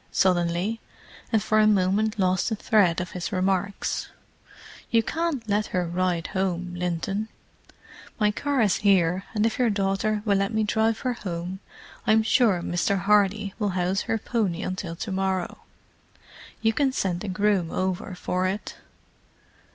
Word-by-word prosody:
suddenly, 180 +4 +1 0.5
and 220 -3 +2
for 215 0 +2
a 215 - +5
moment 210 +2 +2
lost 185 0 +1
the 220 - -1
thread 200 -5 +3
of 180 -1 -4
his 180 -1 -4
remarks. 190 +1 -1 0.8
"You 230 -1 +3
can't 315 -4 -2
let 210 +1 +1
her 180 -1 -1
ride 175 -1 -1
home, 180 -2 -1
Linton—my 195 +4 -4
car 280 +4 0
is 205 -4 +3
here, 190 -2 +2
and 210 +1 +2
if 225 +1 -1
your 245 -2 +3
daughter 205 +1 0
will 200 -2 +3
let 195 +3 -1
me 220 - +2
drive 220 +1 +1
her 255 -2 0
home 180 -3 -5 0.5
I'm 220 0 +5
sure 220 -5 +3
Mr. 185 +2 0
Hardy 205 0 +2
will 210 -2 +1
house 185 +2 +1
her 225 - +2
pony 210 -5 -1
until 185 -2 -4
to 200 +4 -5
morrow—you 190 +3 -5
can 270 +4 +2
send 185 -7 -2
a - - -4
groom 190 -2 +1
over 185 +2 -2
for 185 +1 -1
it. 200 +3 -4
195 Hz, 150 wpm, -25 LUFS, 180-215 Hz, 0.8 s, a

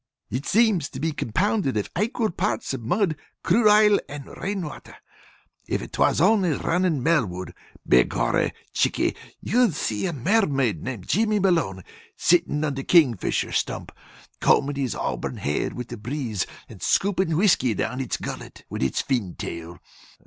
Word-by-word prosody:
It 130 +3 -3
seems 210 -8 +3
to - - -8
be 160 +1 0
compounded 160 - 0
of 105 - -1
aquil 220 - 0
parts 120 -6 -2
of 130 - -4
mud, 180 - +1 0.3
crude 225 -1 +4
ile, 210 -1 +6
and 145 -1 -8
rain 195 -2 -2
water. 150 - -10 0.7
If - - -2
'twas - - +2
only 190 -1 +4
runnin' 170 -2 0
Melwood, 105 - 0 0.3
be 60 0 +6
gorry, - - 0 0.2
Chickie, - - +1 0.3
you'd 235 -7 +2
see 110 - -1
a - - -1
mermaid 140 - +1
named 120 -8 -6
Jimmy 215 +1 +2
Malone 165 - +1 0.3
sittin' 165 -3 +2
on 150 -2 0
the 135 0 -4
Kingfisher 130 - +3
Stump, - - -2 0.5
combin' 140 +1 +3
its 125 - -2
auburn - - -3
hair 75 +1 -1
with 125 -1 -7
a - - -6
breeze, 115 -3 -3 0.2
and - - -12
scoopin' 190 -5 +1
whiskey 170 - +3
down 125 +4 -2
its 130 - -2
gullet - - -8
with - - -4
its 65 -1 0
tail 115 -10 -1 0.4
fin. - - -18
150 Hz, 155 wpm, -24 LUFS, 120-195 Hz, 0.7 s, ile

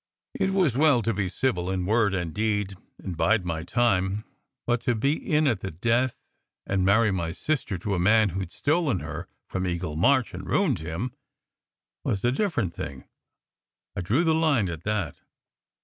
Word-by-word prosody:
It 190 - 0
was 185 -10 +2
well 140 -4 +4
to 115 - +1
be 100 -2 -1
civil 90 -5 -1
in 95 -1 -1
word 105 -1 +2
and 85 -4 -3
deed, 105 -2 -1 0.2
and 95 -3 -6
"bide 100 +3 +2
my 80 -2 -2
time," 100 0 +1 0.4
but 120 -1 +1
to 120 - +1
be 140 +7 +2
in 155 -1 +1
at 115 -8 +1
the 95 - -4
death, 115 +9 +1 0.5
and 95 -1 0
marry 105 +3 +4
my 85 -3 -2
sister 130 - -2
to 100 +4 -3
a 95 - 0
man 105 +3 +4
who 95 +2 -3
d 85 - -8
stolen 145 - 0
her - - -6 0.2
from 95 0 -3
Eagle 85 -3 -3
March 125 - +3
and 90 +1 -7
ruined 150 - +2
him, 85 +10 -4 0.9
was 95 - -1
a 120 - +3
different 130 - 0
thing. 70 -5 -6 0.9
I 100 - -2
drew 115 - +2
the 160 -2 +3
line 150 - +2
at 85 -1 -7
that. 105 -8 -1
105 Hz, 180 wpm, -26 LUFS, 90-125 Hz, 0.9 s, well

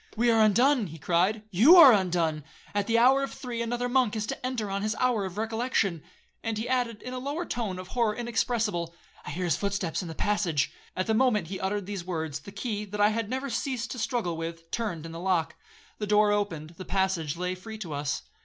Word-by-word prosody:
'We 235 +1 +4
are 225 -1 +4
undone,' 235 +2 +4
he 160 0 -9
cried; 180 +8 +1
'you 235 - +7
are 300 -8 +10
undone. 170 -6 +1 0.3
At 205 -1 0
the 230 0 +3
hour 260 +4 +5
of 275 - -3
three 240 -3 -5
another 240 +1 -1
monk 245 -3 +2
is 215 -1 -1
to - - -5
enter 250 -4 -2
on 200 0 -1
his 215 +2 -1
hour 245 -5 +1
of 190 +1 -7
recollection.' 220 -6 0 0.4
And 225 -2 -2
he 220 - -3
added, 245 -3 -1
in 250 - -6
a 255 - -3
lower 290 +6 -3
tone 220 - -3
of 185 0 -8
horror 230 -4 +1
inexpressible, 225 -7 -1 0.3
'I - - -6
hear 175 +5 -3
his 170 - +1 0.2
steps 185 -4 -2
in 180 - -6
the 160 - -7
passage.' 185 -8 0 0.3
At 185 - 0
the 220 - +1
moment 220 -7 +2
he 190 - -4
uttered 195 +1 -2
these 200 -2 -5
words, 160 -5 -3
the 200 - -11
key, 210 +1 -3
that 210 +1 -7
I 205 0 +5
had 220 -1 -2
never 265 +2 -2
ceased 255 -3 -2
to 250 - -5
struggle 220 -7 -1
with, 165 0 -6
turned 180 -9 -3
in 165 - -7
the 165 - -7
lock. 180 -3 0 0.4
The 210 - -2
door 210 0 +4
opened, 170 -7 -2
the 185 - -6
passage 185 -5 0
lay 180 +1 -2
free 220 +4 -8
to 175 -8 -6
us. 145 0 -2
210 Hz, 230 wpm, -28 LUFS, 180-235 Hz, 0.4 s, are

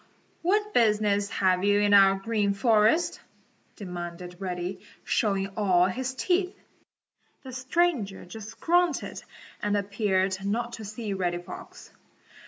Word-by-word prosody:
"What 420 +4 +1
business 210 -3 +2
have 185 -2 +1
you 205 0 +3
in 205 0 +3
our 195 -1 +7
Green 200 0 0
Forest?" 225 +10 +3 0.5
demanded 180 -2 -7
Reddy, 180 0 -4 0.2
showing 195 -3 0
all 185 -4 +3
his 255 +8 -3
teeth. 365 +5 0 0.9
The 260 -2 -9
stranger 255 - 0
just 220 +4 -10
grunted 350 0 +1 0.4
and 205 0 +1
appeared 195 -2 0
not 235 +4 -2
to 220 - -7
see 215 0 -5
Reddy 175 -2 -1
Fox. 175 - -11
205 Hz, 120 wpm, -27 LUFS, 190-240 Hz, 0.9 s, our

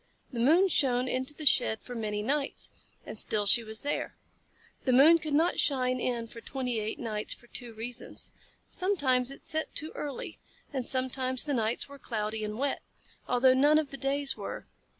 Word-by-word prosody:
The 235 - -3
moon 325 +11 +5
shone 255 -7 +2
into 260 +3 -2
the 305 - -7
shed 220 -5 +3
for 250 - -8
many 210 -3 -2
nights, 280 +4 -1 0.3
and 215 - -7 0.3
she 235 +3 +6
was 220 0 -5
still 290 +5 -1
there. - - -3 0.7
The 260 - +3
moon 310 +6 +8
could 310 -2 -2
not 330 +4 +3
shine 255 -3 +2
in 240 -2 -1
for 230 0 -11
twenty 250 -4 -2
eight 215 +1 -3
nights 215 -3 -2
for - - -19
two 240 -1 -5
reasons. 235 +2 -4 0.4
Sometimes 280 -10 +1
it 275 - -10
set 315 0 -2
too 310 +2 -1
early, 285 -3 -5 0.3
and 260 -3 -2
sometimes 260 -1 +1
the 295 - -1
nights 225 -2 0
were 280 0 -12
cloudy 215 -3 -3
and 210 0 -3
wet, 275 +2 -1 0.5
although 255 +1 +5
none 290 +4 +5
of 310 -3 0
the - - -5
days 275 +1 0
were. - - -6
255 Hz, 185 wpm, -30 LUFS, 235-285 Hz, 0.7 s, moon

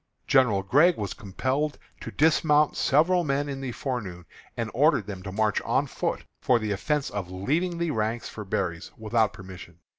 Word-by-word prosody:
General 120 -8 +3
Gregg 150 - +4
was 100 -3 -3
compelled 130 +9 -2 0.2
to - - -7
dismount 150 -1 +3
several 175 +6 +3
men 140 -1 0
in 135 -1 -5
the 130 -2 -3
forenoon, 105 -10 -5 0.3
and 115 -2 -3
ordered 140 - +3
them 95 -2 -7
to 95 0 -7
march 105 +1 +1
on - - +1
foot, - - -3 0.2
for 125 - +3
the 110 -2 -3
offence 140 +8 -1
of 100 -3 -4
leaving 155 - -1
the 170 -1 -1
ranks 110 0 -2
for 105 - -7
berries, 90 -4 -3
without 110 -1 +1
permission. 95 -3 -11
120 Hz, 175 wpm, -26 LUFS, 100-145 Hz, 0.3 s, Gregg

